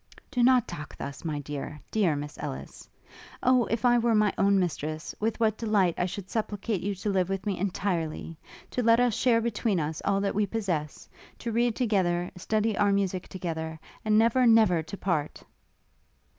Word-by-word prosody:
'Do 245 - 0
not 250 -1 +5
talk 155 -3 -8
thus, 140 -1 -7
my 155 -3 -2
dear, 145 +1 -6
dear 190 -8 +2
Miss 145 +1 -6
Ellis! 65 +1 -7 0.5
Oh! 255 -1 +4
if 230 +2 -2
I 240 0 +5
were 230 -1 +2
my 210 -1 +3
own 200 0 +3
mistress 155 -3 -2
with 220 +1 -1
what 220 -2 +1
delight 205 -6 +2
I 180 - 0
should 190 +1 -6
supplicate 210 -2 -2
you 200 +1 -2
to 200 +2 -2
live 185 -2 +1
with 195 -1 -3
me 195 -4 -1
entirely! 175 -4 -2 0.4
to 250 - -1
let 230 0 +5
us 245 -2 +3
share 230 +1 +3
between 225 -4 0
us 155 0 -3
all 200 -1 +1
that 200 - 0
we 205 0 +1
possess; 180 -9 -3 0.3
to 235 - -4
read 235 0 +1
together, 180 -7 +1
study 215 +4 0
our 205 0 +3
musick 195 -2 0
together, 160 -3 -5 0.2
and 215 -1 +3
never, 235 +3 +4
never 220 -7 +5
to 160 +5 -8
part!' 160 -7 -2
200 Hz, 185 wpm, -28 LUFS, 170-225 Hz, 0.5 s, not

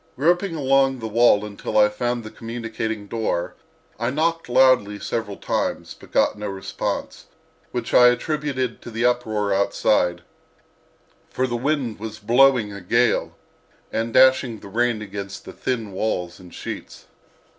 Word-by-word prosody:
Groping 175 +6 +1
along 135 -2 +2
the 110 -2 -5
wall 110 -2 +4
until 105 0 -4
I 105 0 +7
found 120 +3 -2
the 110 - -9
communicating 115 -2 -5
door 110 -5 -2 0.5
I 120 +1 0
knocked 165 +2 -1
loudly 120 -5 +4
several 105 -1 -4
times, - - -2
but - - -16
got - - +2
no 105 - -4
response, 95 -1 -4 0.5
which 120 -2 -4
I 125 - +8
attributed 130 -1 -1
to - - -9
the 115 +1 -1
uproar 110 -5 +1
outside, 90 -3 +1 1.1
for 130 - -1
the 120 -2 -2
wind 130 -3 -1
was 110 0 -6
blowing 120 -1 +3
a 100 - -8
gale 115 +7 +1 0.5
and 115 +1 -2
dashing 130 -2 +4
the 100 - -10
rain 115 0 0
against 100 -1 -7
the - - -9
thin 115 -5 -3
walls 90 -3 -2
in 90 -1 -13
sheets. - - -8
115 Hz, 145 wpm, -22 LUFS, 105-130 Hz, 1.1 s, I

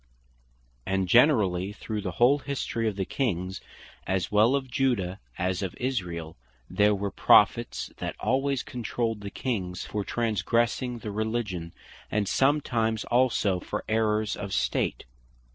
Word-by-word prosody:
And 95 +5 0
generally 100 - +4
through 105 0 -4
the 90 -3 -4
whole 130 +7 +4
History 130 -4 -2
of 105 - -1
the 95 -1 -2
Kings, 95 -8 -2 0.5
as 95 -3 -1
well 110 +6 +4
of 130 -2 -3
Judah, 115 -9 0 0.2
as 90 +1 -1
of 95 -3 -4
Israel, 90 -11 -3 0.3
there 105 0 +3
were 100 0 -3
Prophets - - +3
that - - -5
alwaies 135 0 0
controlled 115 -2 -3
the 100 - -5
Kings, 95 -7 -3
for 105 -1 -3
transgressing 115 +3 0
the 110 -2 -6
Religion; 105 -6 -2 0.4
and 105 -2 0
sometimes 120 -6 +1
also 120 -6 +2
for - - -4
Errours 110 -1 +1
of 100 -2 -5
State; - - 0
(2 - - -18
Chro. - - -33
110 Hz, 145 wpm, -27 LUFS, 95-120 Hz, 0.5 s, generally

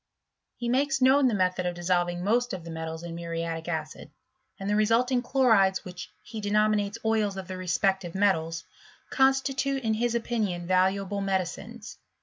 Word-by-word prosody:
He 240 - -4
makes 280 +5 +1
known 265 +1 +5
the 235 - +1
method 180 -1 0
of 175 - -3
dissolving 175 0 0
most 240 +4 +1
of 180 - -5
the 170 - -8
metals 160 0 -5
in 170 -1 -6
muriatic 165 -1 -4
acid, 160 -2 -5 0.5
and 195 - -5
the 205 - +1
resulting 235 +4 +2
chlorides, 225 -7 +3
which 180 -1 -8
he 220 -2 -7
denominates 210 0 +1
oils 215 -3 +1
of 190 -1 -6
the 185 - -5
respective 185 +1 -1
metals, 165 -5 +1 0.5
constitute 270 0 +1
in 220 -1 +1
his 235 +2 0
opinion 215 -7 -1
valuable 190 +2 +1
medicines. 195 +4 -4
200 Hz, 155 wpm, -27 LUFS, 175-235 Hz, 0.5 s, known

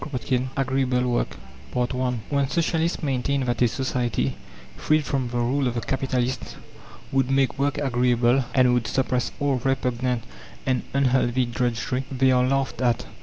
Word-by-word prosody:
CHAPTER 135 -2 -4
X 125 - +1
AGREEABLE 130 -2 +1
WORK 120 - -1 0.4
I 125 0 0
When 140 -1 +2
Socialists 165 +1 0
maintain 135 0 0
that 120 0 -1
a 120 - +6
society, 125 -1 -1 0.4
freed 155 -1 +1
from 135 -3 -1
the 120 - -3
rule 130 +3 +1
of 120 - -2
the 120 - -1
capitalists, 130 -1 -2 0.6
would 135 -1 +1
make 135 0 +1
work 145 +1 +1
agreeable, 125 -2 +2
and 125 -2 +5
would 120 -2 +1
suppress 130 -1 0
all 140 -2 +1
repugnant 125 -2 0 0.4
and 130 -2 +1
unhealthy 130 -2 +2
drudgery, 120 +2 -1
they 130 0 +3
are 125 0 +3
laughed 135 0 -1
at. 120 -2 +1
130 Hz, 155 wpm, -24 LUFS, 125-135 Hz, 0.6 s, a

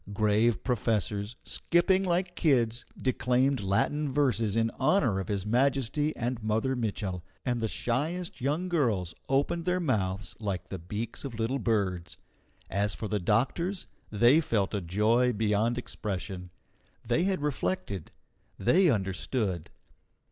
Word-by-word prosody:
Grave 110 +2 +2
professors, 110 -2 -1
skipping 185 +3 +2
like 180 0 0
kids, 120 -7 +2
declaimed 130 +1 +1
Latin 135 +9 0
verses 125 -7 +1
in 115 0 +2
honour 135 - +3
of 95 - -4
His 100 -2 -2
Majesty 135 +5 +1
and 120 0 -2
Mother 110 +5 0
Mitchel, 100 -6 -2 0.2
and 120 -2 0
the 110 - +1
shyest 155 +12 -2
young 150 +8 0
girls 115 - 0 0.2
opened 145 +5 +1
their 180 0 +1
mouths 105 - -1
like 95 -4 -3
the 95 - -5
beaks 105 +7 -5
of 120 -5 -6
little 120 +5 0
birds. 100 -6 -1 0.5
As 100 +1 0
for 110 - -4
the 105 0 -1
doctors, 135 - 0 0.2
they 120 +9 +5
felt 105 -10 0
a 100 - -1
joy 110 +8 +2
beyond 110 +2 +1
expression. 95 -5 -4 0.6
They 170 - +2
had 190 -6 0
reflected. 95 - -2 0.5
They 175 +9 +4
understood. 95 - -1
115 Hz, 135 wpm, -29 LUFS, 100-140 Hz, 0.6 s, they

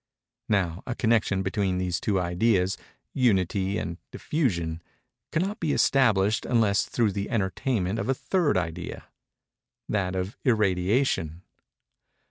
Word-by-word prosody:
Now 95 -5 0
a 120 - -2
connection 110 -5 +1
between 95 -1 0
these 90 -2 -1
two 100 -3 0
ideas—unity 95 +1 0
and 85 +1 -4
diffusion—cannot 130 - -3
be 155 -3 0
established 110 -6 +3
unless 110 -5 +2
through 115 -4 +1
the 100 +1 -3
entertainment 105 0 -1
of - - -3
a 135 - +2
third 145 - +1
idea—that 90 +2 -6
of 95 +3 -3
irradiation. 95 - +1
100 Hz, 100 wpm, -26 LUFS, 90-120 Hz, -, established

